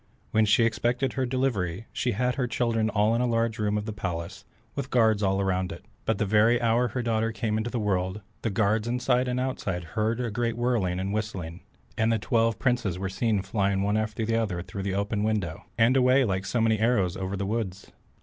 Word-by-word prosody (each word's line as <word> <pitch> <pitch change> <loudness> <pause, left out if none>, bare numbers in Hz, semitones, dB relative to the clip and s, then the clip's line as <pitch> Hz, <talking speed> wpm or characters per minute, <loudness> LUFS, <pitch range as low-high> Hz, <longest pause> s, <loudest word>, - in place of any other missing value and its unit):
When 110 0 +4
she 105 +3 +4
expected 120 +3 0
her 130 -2 -1
delivery, 115 -7 -1
she 125 - 0
had 125 +4 +1
her 125 -1 -1
children 115 -2 0
all 105 +1 +2
in 115 - +1
a 125 - +2
large 115 -1 0
room 105 0 +1
of 105 - -3
the 110 - -4
palace, 85 -5 -5 0.3
with 140 -2 -4
guards 110 -5 +3
all 95 0 +1
round 95 -1 0
it, 85 +4 -9 0.2
but 110 - +1
the 105 - 0
very 110 +4 +4
hour 120 +1 +2
her 120 +2 -3
daughter 115 -1 0
came 110 -1 -2
into 110 +2 -1
the 120 - -3
world, 95 -1 -1 0.2
the 115 - -1
guards 105 +2 +1
inside 125 +1 +1
and 125 0 -1
outside 100 -9 -2
heard 110 +2 0
a 120 -3 -2
great 115 +1 -1
whirling 115 -7 0
and 95 +2 -2
whistling, 95 -6 -4 0.4
and 110 +1 +3
the 115 - +2
twelve 115 0 +1
princes 120 -9 0
were 95 0 -3
seen 105 0 0
flying 100 0 0
one 105 +1 +1
after 110 +1 -1
another 110 -4 0
out 85 - -5
through 100 - -6
the 95 0 -2
open 100 +1 -1
window, 105 -7 -2
and 115 +3 +4
away 130 +1 +4
like 95 -2 -1
so 120 - 0
many 110 -1 +2
arrows 110 -6 +2
over 95 +1 -3
the 100 - -2
woods. 100 -3 -3
110 Hz, 220 wpm, -27 LUFS, 100-120 Hz, 0.4 s, When